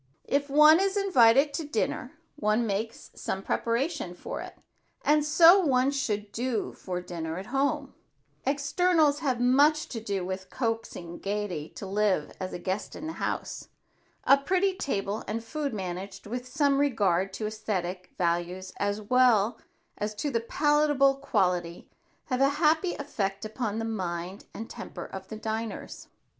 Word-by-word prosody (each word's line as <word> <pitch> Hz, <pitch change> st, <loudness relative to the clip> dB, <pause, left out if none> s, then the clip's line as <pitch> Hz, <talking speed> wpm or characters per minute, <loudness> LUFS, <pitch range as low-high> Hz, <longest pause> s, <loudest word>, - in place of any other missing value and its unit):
If 280 Hz, 0 st, 0 dB
one 300 Hz, +3 st, +7 dB
is 390 Hz, +1 st, +1 dB
invited 275 Hz, -, +5 dB
out -, -, -20 dB
to 325 Hz, -, -2 dB
dinner, 300 Hz, -, -2 dB, 0.2 s
one 220 Hz, -3 st, +1 dB
makes 220 Hz, +2 st, -3 dB
some 190 Hz, -, -4 dB
preparation 235 Hz, -, -1 dB
for -, -, -6 dB
it, -, -, -9 dB, 0.5 s
and 300 Hz, 0 st, +4 dB
so 330 Hz, +5 st, +7 dB
one 270 Hz, -6 st, +3 dB
should 210 Hz, -7 st, -2 dB
do 240 Hz, 0 st, -2 dB
for 180 Hz, -1 st, -5 dB
dinner 165 Hz, -2 st, -5 dB
at 190 Hz, -, -6 dB
home. 275 Hz, +1 st, 0 dB, 0.5 s
Externals 290 Hz, +2 st, +2 dB
have 265 Hz, -6 st, 0 dB
much 285 Hz, +5 st, +4 dB
to 230 Hz, -, -4 dB
do 200 Hz, -4 st, -2 dB
with 190 Hz, 0 st, -5 dB
coaxing 225 Hz, -8 st, -3 dB
gaiety 195 Hz, -6 st, -3 dB
to -, -, -6 dB
live 195 Hz, -5 st, +1 dB
as 185 Hz, -1 st, -4 dB
a -, -, -4 dB
guest 185 Hz, +3 st, -3 dB
in 310 Hz, -, -7 dB
the 320 Hz, -, -4 dB
house. -, -, -4 dB, 0.6 s
A 275 Hz, -, +6 dB
pretty 375 Hz, +7 st, +1 dB
table 205 Hz, -, -2 dB
and 225 Hz, +2 st, -3 dB
food 285 Hz, +4 st, -3 dB
managed 190 Hz, -1 st, -5 dB
with 245 Hz, +4 st, -5 dB
some 280 Hz, +1 st, +2 dB
regard 195 Hz, -9 st, +2 dB
to 215 Hz, -, -4 dB
esthetic 195 Hz, -4 st, -3 dB
values 175 Hz, +2 st, -1 dB
as 205 Hz, +1 st, -1 dB
well 235 Hz, -2 st, +3 dB, 0.4 s
as 210 Hz, +1 st, -2 dB
to 285 Hz, +7 st, -2 dB
the 230 Hz, -2 st, 0 dB
palatable 290 Hz, +1 st, +3 dB
quality, 180 Hz, -10 st, 0 dB, 0.4 s
have 255 Hz, -1 st, -1 dB
a 275 Hz, -, +6 dB
happy 320 Hz, +3 st, +2 dB
effect 200 Hz, -9 st, -3 dB
upon 215 Hz, -1 st, -3 dB
the 225 Hz, -, -2 dB
mind 185 Hz, -3 st, -4 dB
and 225 Hz, -, -7 dB
temper -, -, -8 dB
of 190 Hz, 0 st, -8 dB
the 220 Hz, -, -7 dB
diners. 220 Hz, 0 st, -5 dB
225 Hz, 155 wpm, -28 LUFS, 195-285 Hz, 0.6 s, one